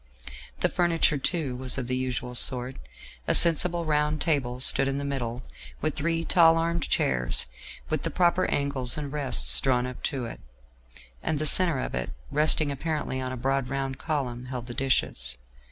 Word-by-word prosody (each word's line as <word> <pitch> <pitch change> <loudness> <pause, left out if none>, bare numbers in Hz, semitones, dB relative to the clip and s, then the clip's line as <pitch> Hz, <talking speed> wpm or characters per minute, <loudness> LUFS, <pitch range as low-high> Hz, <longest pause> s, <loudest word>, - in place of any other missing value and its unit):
The - - +3
furniture, 165 -4 +1
too, 145 -3 -2
was 130 0 +1
of 130 - -3
the 125 +1 -2
usual 125 -1 -4
sort; 125 +1 +5 0.5
a - - +2
sensible 170 +1 +4
round 150 0 0
table 130 -7 -1
stood 135 +1 +6
in 135 0 -2
the 140 - -4
middle, 125 -3 -4 0.4
with 155 -1 -2
three 165 +2 -2
tall 165 -2 +4
arm 170 +1 -1
chairs, 60 - +1 0.4
with - - -2
the - - -3
proper 180 0 +1
angles 140 -3 -1
and 145 -2 -6
rests, 65 - +3
drawn 125 -2 0
up 125 -1 -8
to 135 -5 -3
it; 115 - -9 0.8
and 155 - -2
the 155 - -2
centre 170 0 +5
of - - -5
it, 60 - -4 0.2
resting 155 -1 +1
apparently 145 -2 -4
on 130 0 -4
a 130 - -6
broad 135 +1 -1
round 135 -1 -4
column, 130 -6 -4
held 125 -2 -7
the 120 - -8
dishes. - - -2
135 Hz, 175 wpm, -25 LUFS, 125-155 Hz, 0.8 s, stood